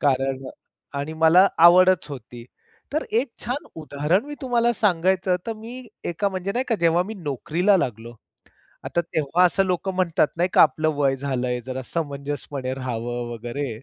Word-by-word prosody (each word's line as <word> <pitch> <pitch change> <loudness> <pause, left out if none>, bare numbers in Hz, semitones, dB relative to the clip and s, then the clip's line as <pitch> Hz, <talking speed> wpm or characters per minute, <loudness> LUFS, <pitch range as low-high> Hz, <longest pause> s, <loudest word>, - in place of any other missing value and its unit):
कारण 135 -1 0
अ - - -6 0.5
आणि 145 +3 -4
मला 175 +4 +7 0.2
आवडच 180 -1 +6
होती. 125 -4 -9 0.5
तर 310 - -1
एक 240 +4 0
छान 255 +5 -3
उदाहरण 155 - 0
मी 295 +1 -7
तुम्हाला 240 -2 +2
सांगायचं 185 -3 +1
तर 230 - -1
मी 240 +3 -9 0.2
एका 185 +4 -1
म्हणजे, 190 0 -4
नाही 250 +4 -1
का 230 - +2
जेव्हा 170 +1 +3
मी 210 +4 -7
नोकरीला 170 - +1
लागलो 120 - -3 0.7
आता 170 - 0
तेव्हा 165 +1 +1
असं 195 +2 +3
लोक 185 +1 -1
म्हणतात, 180 -5 +1
नाही 175 +2 +1
का, - - +7
आपलं 155 +1 +2
वय 135 -2 +2
झालंय 125 -2 -2
जरा 130 0 -4
समंजसपणे 140 -3 -4
राहावं 120 -2 -4
वगैरे, 120 +5 -4
165 Hz, 160 wpm, -23 LUFS, 135-190 Hz, 0.7 s, मला